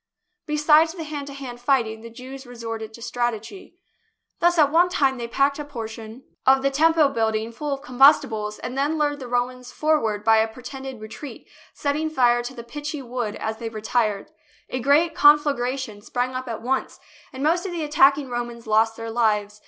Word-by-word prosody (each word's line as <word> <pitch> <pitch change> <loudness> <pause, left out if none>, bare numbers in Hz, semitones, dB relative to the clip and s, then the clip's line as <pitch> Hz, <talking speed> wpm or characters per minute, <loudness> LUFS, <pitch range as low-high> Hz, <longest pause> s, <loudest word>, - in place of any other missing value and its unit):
Besides 300 +2 +4
the 335 - -5
hand 295 -2 -6
to 280 - -8
hand 260 -3 -8
fighting, 235 -4 +1
the 230 - -9
Jews 260 +3 -10
resorted 225 -2 -6
to 235 - -14
strat 240 0 -1
egy. 345 - -12 0.6
Thus 345 0 +3
at 295 -3 +5
one 345 +3 +4
time 270 -7 +1
they 235 - -4
packed 280 +4 +1
a - - -3
portion 225 -6 -7
THE - - -10
BOOK 220 - -11
OF 265 - -18
FAMOUS - - -39
SIEGES 265 +1 +4
of 265 - -8
the 275 0 0 0.3
Temple 290 - +5
building 225 -3 -1
full 290 +5 -4
of 275 - -14
combustibles 235 -5 +3
and 250 - -6
then 290 +4 0
lured 290 -1 0
the 255 - -7
Romans 245 +1 -2
forward 225 -10 0
by 225 0 +5
a 220 0 +3
pretended 255 +2 -8
re 215 - -7
treat, 280 +5 -10 0.3
setting 300 +2 -1
fire 245 -5 +3
to 245 +2 -7
the 235 - -8
pitchy 295 +3 -6
wood 240 -3 -4
as 220 0 -4
they 230 -1 -5
retired. 215 0 -1 0.4
A 255 - -2
great 295 +6 +3
conflagration 270 -7 +3
sprang 245 +4 -2
up 255 0 -5
at 225 -1 -5
once, 265 +2 -2 0.3
and 265 +1 -6
most 345 +5 +1
of - - -5
the 340 -2 -3
attacking 285 -1 +4
Romans 240 -1 -5
lost 225 +1 +2
their 230 0 -5
lives. 210 -3 0
255 Hz, 205 wpm, -23 LUFS, 230-290 Hz, 0.6 s, at